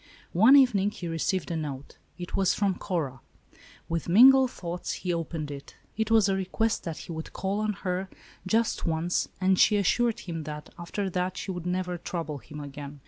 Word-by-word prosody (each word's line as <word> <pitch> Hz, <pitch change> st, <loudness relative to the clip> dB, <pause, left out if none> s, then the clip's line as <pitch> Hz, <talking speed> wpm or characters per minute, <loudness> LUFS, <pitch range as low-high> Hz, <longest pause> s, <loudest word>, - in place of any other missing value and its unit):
One 225 Hz, +10 st, +7 dB
evening 220 Hz, -8 st, +5 dB
he 180 Hz, -4 st, -7 dB
received 165 Hz, +2 st, -1 dB
a -, -, -1 dB
note. 145 Hz, -3 st, -6 dB, 0.2 s
It 175 Hz, 0 st, -6 dB
was 190 Hz, -2 st, +2 dB
from 200 Hz, -2 st, +1 dB
Cora. 155 Hz, -10 st, -3 dB, 0.7 s
With 165 Hz, 0 st, -3 dB
mingled 260 Hz, +7 st, +7 dB
thoughts 175 Hz, -5 st, -5 dB
he 180 Hz, -2 st, -2 dB
opened 165 Hz, -3 st, -4 dB
it. 140 Hz, -1 st, -9 dB, 0.2 s
It 220 Hz, 0 st, -1 dB
was 220 Hz, -3 st, +5 dB
a 195 Hz, -, +2 dB
request 205 Hz, +4 st, -1 dB
that 165 Hz, -3 st, -4 dB
he -, -, -8 dB
would 160 Hz, -1 st, -6 dB
call 195 Hz, +2 st, -2 dB
on 215 Hz, 0 st, 0 dB
her, 185 Hz, +1 st, -1 dB, 0.4 s
just 225 Hz, +3 st, +1 dB
once, 165 Hz, +2 st, 0 dB
and 185 Hz, 0 st, +3 dB
she 210 Hz, -, +5 dB
assured 235 Hz, +4 st, +1 dB
him 165 Hz, -3 st, -5 dB
that, 150 Hz, 0 st, -8 dB
after 195 Hz, +4 st, -3 dB
that, 180 Hz, +1 st, -2 dB
she 195 Hz, -, -4 dB
would 175 Hz, -1 st, -5 dB
never 180 Hz, -1 st, -2 dB
trouble 165 Hz, -4 st, -4 dB
him 150 Hz, +3 st, -10 dB
again. 145 Hz, 0 st, -8 dB
180 Hz, 190 wpm, -27 LUFS, 165-200 Hz, 0.7 s, One